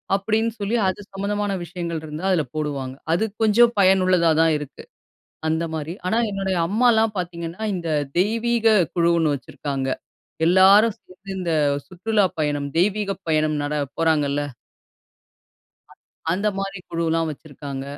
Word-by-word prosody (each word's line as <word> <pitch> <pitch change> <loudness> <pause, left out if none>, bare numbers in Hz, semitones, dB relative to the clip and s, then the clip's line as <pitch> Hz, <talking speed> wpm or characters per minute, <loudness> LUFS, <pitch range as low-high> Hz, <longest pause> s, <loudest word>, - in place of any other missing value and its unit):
அப்டின்னு 220 +3 0
சொல்லி 205 +3 -1
அது 185 - -2
சம்மந்தமான 205 +1 -2
விஷயங்கள் 170 -2 -5
இருந்தா 155 +4 -6
அதில 170 -4 +2
போடுவாங்க. 140 -4 -3 0.2
அது 180 +6 +2 0.2
கொஞ்சம் 235 +2 +5
பயனுள்ளதா 185 -3 +4
தான் 165 -1 +4
இருக்கு 150 -2 -9 0.7
அந்த 160 +1 0
மாரி. 160 +1 -4
ஆனா, 220 - +1
என்னுடைய 195 -2 -1
அம்மாலாம் 220 +1 +3
பார்த்தீங்கன்னா, 170 +2 -5
இந்த 170 -2 -5 0.3
தெய்வீக 225 +2 +2 0.2
குழுன்னு 170 -3 +3
வச்சிருக்காங்க 135 0 -4 0.6
எல்லாரும் 195 +5 +6
சேர்ந்து 185 +2 -16
இந்த 175 -3 -1 0.3
சுற்றுலா 205 +3 +1
பயணம் 145 -2 -1
தெய்வீகப் 195 0 0
பயணம் 155 -1 +2
நட 145 +1 -2 0.2
போறாங்கல்ல. 145 -3 +1 1.5
அ - - -15 0.4
அந்த 200 +4 0
மாரி 195 0 -4
குழுலாம் 165 -1 0
வச்சுருக்காங்க. 140 -2 -7
180 Hz, 125 wpm, -22 LUFS, 155-205 Hz, 1.5 s, எல்லாரும்